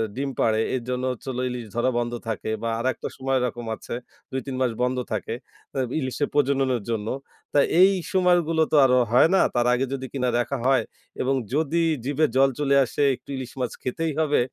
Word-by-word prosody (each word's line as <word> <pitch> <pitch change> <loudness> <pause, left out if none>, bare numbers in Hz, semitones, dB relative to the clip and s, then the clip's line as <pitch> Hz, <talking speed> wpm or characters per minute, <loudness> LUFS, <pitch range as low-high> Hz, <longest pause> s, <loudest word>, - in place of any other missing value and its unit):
ডিম 140 +1 -2
পাড়ে, 110 0 +3
এর 125 - -3
জন্য 125 0 -2
হচ্ছে 125 +2 -9 0.2
ইলিশ 125 -2 -5
ধরা 120 +2 +2
বন্ধ 120 0 -2
থাকে 110 -1 -3
বা 115 - 0
আরেকটা 130 +1 -1
সময় 135 0 0
এরকম 120 -1 -3
আছে। - - -8 0.4
২-৩ 130 0 -4
মাস 125 -2 +2
বন্ধ 125 +1 0
থাকে। 110 +1 -2 0.4
তো - - -8 0.2
ইলিশের 135 +1 -1
প্রজননের 135 -4 +2
জন্য। 110 -2 -2 0.5
তাই 145 - +5 0.2
এই 190 - +8 0.2
সময়গুলো 175 -3 +3
তো - - +3
আরো 125 -1 +4
হয় 125 +6 +6
না। - - +5 0.2
তার 120 0 +2
আগে 125 +2 +1
যদি 130 -1 -4
কিনা 125 -2 0
দেখা 135 +3 -1
হয় 135 0 +4 0.4
এবং 135 +1 +1 0.2
যদি 160 +2 +1 0.2
জিভে 145 +3 +2
জল 135 +1 +5
চলে 140 -1 +2
আসে 120 - -4
একটু - - -23
ইলিশ 130 -2 -6
মাছ 125 - -1
খেতেই 160 +5 -2
হবে, 150 -2 +2
130 Hz, 190 wpm, -24 LUFS, 120-145 Hz, 0.5 s, এই